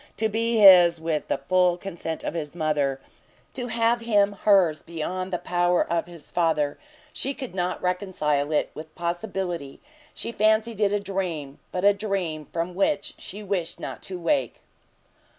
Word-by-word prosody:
to 220 Hz, -, +2 dB
be 230 Hz, +2 st, 0 dB
his 180 Hz, -5 st, +8 dB
with 160 Hz, -2 st, -2 dB
the -, -, 0 dB
full 180 Hz, +4 st, +2 dB
consent 170 Hz, -4 st, -5 dB
of -, -, -3 dB
his 155 Hz, -2 st, -5 dB
mother, 150 Hz, -4 st, 0 dB, 0.5 s
to 245 Hz, -2 st, -3 dB
have 230 Hz, 0 st, +2 dB
him 205 Hz, -3 st, +3 dB
her's, 185 Hz, -7 st, +4 dB
beyond 185 Hz, +3 st, -4 dB
the 180 Hz, -, 0 dB
power 175 Hz, 0 st, +1 dB
of 170 Hz, 0 st, -1 dB
his 170 Hz, -3 st, -12 dB
father, 160 Hz, -4 st, +1 dB, 0.3 s
she 275 Hz, +1 st, -3 dB
could 260 Hz, -7 st, -7 dB
not 180 Hz, -1 st, -1 dB
reconcile 170 Hz, -6 st, 0 dB
it 150 Hz, -, +1 dB
with 155 Hz, 0 st, -10 dB
possibility; 175 Hz, -4 st, -3 dB, 0.4 s
she -, -, -4 dB
fancied 220 Hz, 0 st, +2 dB
it 200 Hz, -1 st, +3 dB
a 205 Hz, -, +1 dB
dream, 180 Hz, -8 st, -4 dB
but 185 Hz, +1 st, -1 dB
a 205 Hz, -, +7 dB
dream 190 Hz, -7 st, -3 dB
from 170 Hz, +2 st, -2 dB
which 195 Hz, +1 st, 0 dB
she 205 Hz, +3 st, -7 dB
wished 185 Hz, -4 st, -2 dB
not -, -, -6 dB
to 185 Hz, -, -6 dB
wake. 275 Hz, -, 0 dB
180 Hz, 165 wpm, -25 LUFS, 165-205 Hz, 0.5 s, his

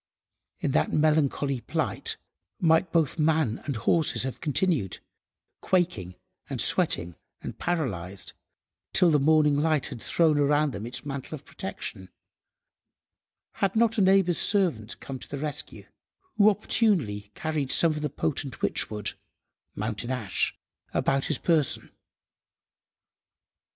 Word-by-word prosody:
In -, -, 0 dB
that 75 Hz, -, +1 dB
melancholy 145 Hz, -4 st, +1 dB
plight -, -, -2 dB, 0.4 s
might 165 Hz, 0 st, +3 dB
both 165 Hz, -1 st, +1 dB
man 155 Hz, -7 st, +1 dB
and 140 Hz, -, -2 dB
horses 155 Hz, +7 st, +1 dB
have 130 Hz, -1 st, -5 dB
continued—quaking, 150 Hz, -, -2 dB, 0.3 s
and -, -, -4 dB
sweating, 85 Hz, 0 st, +1 dB, 0.3 s
and -, -, -7 dB
paralysed—till 95 Hz, -, -2 dB
the 150 Hz, -, +4 dB
morning 150 Hz, 0 st, +4 dB
light 155 Hz, -1 st, +1 dB
had 125 Hz, -5 st, -8 dB
thrown 155 Hz, +2 st, +2 dB
around 145 Hz, +1 st, +3 dB
them 105 Hz, 0 st, -6 dB
its 125 Hz, +3 st, -7 dB
mantle 140 Hz, -2 st, -5 dB
of -, -, -13 dB
protection—had 140 Hz, -, -8 dB
not 230 Hz, 0 st, +3 dB
a -, -, +4 dB
neighbour's 190 Hz, -2 st, +4 dB
servant 165 Hz, -, +1 dB
come 135 Hz, -1 st, -7 dB
to -, -, -11 dB
the 145 Hz, -, -4 dB
rescue, 150 Hz, +1 st, -5 dB, 0.5 s
who 210 Hz, 0 st, +6 dB
opportunely 175 Hz, -, 0 dB
carried 155 Hz, -4 st, -2 dB
some 165 Hz, -, +3 dB
of 150 Hz, -1 st, -4 dB
the 150 Hz, -, -1 dB
potent 135 Hz, -2 st, -3 dB
witchwood 105 Hz, -2 st, 0 dB, 0.6 s
(mountain–ash) 110 Hz, +1 st, -2 dB, 0.4 s
about 135 Hz, 0 st, +1 dB
his 155 Hz, -, 0 dB
person. 160 Hz, -6 st, +1 dB
145 Hz, 115 wpm, -27 LUFS, 120-165 Hz, 0.6 s, who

